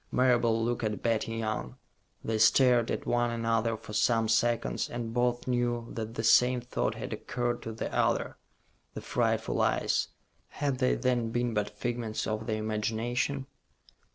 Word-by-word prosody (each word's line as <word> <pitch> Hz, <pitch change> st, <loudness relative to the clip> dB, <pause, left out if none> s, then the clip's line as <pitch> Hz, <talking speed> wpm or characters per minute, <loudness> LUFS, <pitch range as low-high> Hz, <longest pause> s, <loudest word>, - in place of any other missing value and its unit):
Marable 120 Hz, -3 st, +3 dB
looked 120 Hz, 0 st, -1 dB
at 105 Hz, -1 st, -2 dB
Betty 115 Hz, -1 st, 0 dB
Young. 110 Hz, -, -3 dB, 0.5 s
They 110 Hz, -1 st, -1 dB
stared 120 Hz, +1 st, +5 dB
at -, -, -2 dB
one 120 Hz, 0 st, +1 dB
another 115 Hz, -1 st, 0 dB
for 105 Hz, -, -11 dB
some 115 Hz, 0 st, +2 dB
seconds, 115 Hz, +1 st, +1 dB
and 115 Hz, -1 st, -4 dB
both 120 Hz, 0 st, 0 dB
knew 120 Hz, -1 st, 0 dB
that 115 Hz, 0 st, -5 dB
the 110 Hz, -, -3 dB
same 125 Hz, +2 st, +5 dB
thought 120 Hz, +1 st, -2 dB
had -, -, -5 dB
occurred 120 Hz, -1 st, -2 dB
to 115 Hz, -, -5 dB
the 110 Hz, -, -5 dB
other. -, -, +1 dB, 0.6 s
The -, -, -5 dB
frightful -, -, 0 dB
eyes -, -, +1 dB, 0.4 s
had 140 Hz, -3 st, -2 dB
they 130 Hz, -1 st, +3 dB
then 125 Hz, -2 st, 0 dB
been 120 Hz, 0 st, -1 dB
but 105 Hz, -1 st, 0 dB
figments 120 Hz, -2 st, -2 dB
of 110 Hz, +1 st, -3 dB
the 110 Hz, -, 0 dB
imagination? 110 Hz, +5 st, -1 dB
115 Hz, 155 wpm, -29 LUFS, 110-120 Hz, 0.6 s, stared